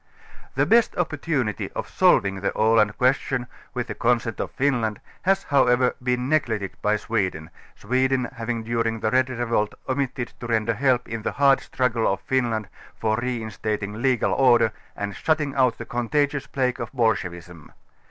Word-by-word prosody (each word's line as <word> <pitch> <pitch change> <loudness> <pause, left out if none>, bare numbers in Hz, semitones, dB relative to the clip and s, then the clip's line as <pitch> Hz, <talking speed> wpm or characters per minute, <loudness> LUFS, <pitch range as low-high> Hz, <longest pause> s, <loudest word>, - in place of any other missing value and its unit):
The - - +3
best 230 0 +4
opportunity 150 - -1
of - - -4
solving 95 -1 +3
the 100 - +1
xiland 110 -1 +2
question, 130 0 +1 0.3
with 125 -1 -1
the - - -5
consent 115 -1 0
of - - -2
Finland 120 -6 0 0.2
has 195 +1 +2
however 125 -3 +3
been 125 0 0
neglected 115 -10 0
by 105 +1 +2
Swe 105 -2 0
den, 80 -2 -11 0.2
Sweden 130 0 +1
having 115 -1 -3
during 115 -1 -1
the 110 - 0
red 130 0 +3
revolt 115 -4 -1
omitted 130 -2 -2
to 120 - -6
ren 110 -2 +1
der 115 - +1
help 125 +1 +1
in 115 -1 -4
the - - -3
hard 140 -1 +4
struggle 120 -4 0
of 95 - -2
Finland 120 -5 0 0.3
for 110 -1 +1
reinstating 110 -3 -3
legal 130 -3 +2
order 120 -4 +4 0.2
and 100 0 -4
shutting 155 -3 0
out 130 -4 +2
the - - -7
contagious 145 +4 -1
plague 130 -2 -1
of - - -5
bolsche 110 -6 +1
vism. 85 -2 -12
120 Hz, 165 wpm, -24 LUFS, 110-130 Hz, 0.3 s, best